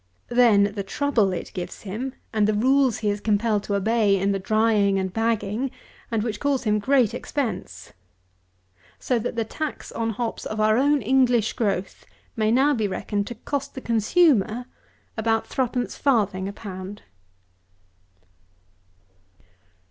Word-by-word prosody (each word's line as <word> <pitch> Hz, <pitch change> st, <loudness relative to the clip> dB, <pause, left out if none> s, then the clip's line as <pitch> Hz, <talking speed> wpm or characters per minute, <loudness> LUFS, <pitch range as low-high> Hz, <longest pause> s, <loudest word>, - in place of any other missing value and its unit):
Then 215 Hz, -5 st, +4 dB
the 205 Hz, -, -3 dB
trouble 220 Hz, -1 st, +1 dB
it 180 Hz, -, -5 dB
gives 180 Hz, -2 st, -6 dB
him, 230 Hz, +7 st, -5 dB, 0.2 s
and 210 Hz, -1 st, +2 dB
the 215 Hz, -, +1 dB
rules 260 Hz, +2 st, +3 dB
he 210 Hz, -2 st, 0 dB
is 205 Hz, 0 st, -4 dB
compelled 210 Hz, 0 st, +1 dB
to 200 Hz, -, -1 dB
obey 210 Hz, 0 st, +2 dB
in 195 Hz, +1 st, +1 dB
the 195 Hz, -, -1 dB
drying 210 Hz, 0 st, +2 dB
and 190 Hz, -1 st, -2 dB
bagging, 225 Hz, +2 st, -1 dB, 0.4 s
and 225 Hz, -2 st, 0 dB
which 215 Hz, -3 st, -3 dB
cause 280 Hz, -2 st, 0 dB
him 210 Hz, -2 st, +1 dB
great 255 Hz, 0 st, +2 dB
expense. 270 Hz, -7 st, -4 dB, 1.0 s
So 250 Hz, -2 st, 0 dB
that 240 Hz, +2 st, -4 dB
the 230 Hz, -1 st, -1 dB
tax 310 Hz, +7 st, -5 dB
on 230 Hz, 0 st, -2 dB
hops 225 Hz, +1 st, -3 dB
of 215 Hz, -, -5 dB
our 215 Hz, 0 st, +4 dB
own 280 Hz, +2 st, +2 dB
English 245 Hz, -2 st, +3 dB
growth, 195 Hz, -5 st, -2 dB, 0.3 s
may 215 Hz, -1 st, +1 dB
now 270 Hz, +5 st, +4 dB
be 220 Hz, -5 st, 0 dB
reckoned 200 Hz, +1 st, -3 dB
to 240 Hz, -, -6 dB
cost 280 Hz, +5 st, -4 dB
the -, -, -4 dB
consumer 235 Hz, -, +2 dB, 0.5 s
about 225 Hz, 0 st, +1 dB
3 260 Hz, -, 0 dB
1/4_d._ 225 Hz, -6 st, 0 dB
a -, -, -7 dB
pound. 195 Hz, 0 st, -8 dB
220 Hz, 150 wpm, -24 LUFS, 205-250 Hz, 1.0 s, Then